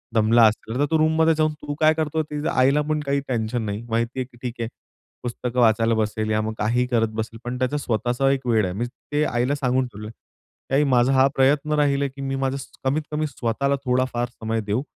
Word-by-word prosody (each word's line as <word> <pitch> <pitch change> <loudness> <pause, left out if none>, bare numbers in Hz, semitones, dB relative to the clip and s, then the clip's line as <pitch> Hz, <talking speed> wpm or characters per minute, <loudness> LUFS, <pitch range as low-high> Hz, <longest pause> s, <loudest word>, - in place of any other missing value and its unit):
दमला 115 +1 +5
असेल." 110 +3 -3
तर, 145 - +3
तू 160 - +4
रूममध्ये 160 +1 +3
जाऊन 155 0 +1
तू 145 0 -4
काय 155 0 +5
करतो 160 0 -1
ते 150 +1 -4
आईला 135 +3 +3
पण 155 0 +1
काही 140 0 +1
टेन्शन 115 -1 -1
नाही 105 +2 -4
माहिती 115 +3 -1
आहे, 130 - -1
की 120 - -18
ठीक 125 -1 -4
आहे, 115 - -1 0.6
पुस्तकं 125 +1 -3
वाचायला 115 -1 +4
बसेल, 110 0 -1
या 110 0 +2
मग, 110 +1 -3
काहीही 120 +4 +1
करत 115 -2 +2
बसेल. 110 +1 -5
पण, 120 +1 -4
त्याचा 130 +3 0
स्वतःचा 125 0 0
एक 135 -2 -2
वेळ 110 -3 +3
आहे. 90 - -3
मी 115 +5 -2
ते 145 +4 -3
आईला 125 +2 0
सांगून 130 -2 0
ठेवलंय, 105 -1 -9
की 135 - -9
आई 145 - +4
माझा 125 +2 +4
हा 130 0 +5
प्रयत्न 145 +3 +2
राहील 140 -1 +2
आहे, 140 - 0
की 135 +1 -11
मी 135 0 -2
माझं 135 0 -1 0.3
कमीत-कमी 150 +3 -1
स्वतःला 140 +1 -1
थोडाफार 125 -1 0
समय 115 -2 -3
देऊ. 105 +4 -1
125 Hz, 215 wpm, -23 LUFS, 115-140 Hz, 0.6 s, दमला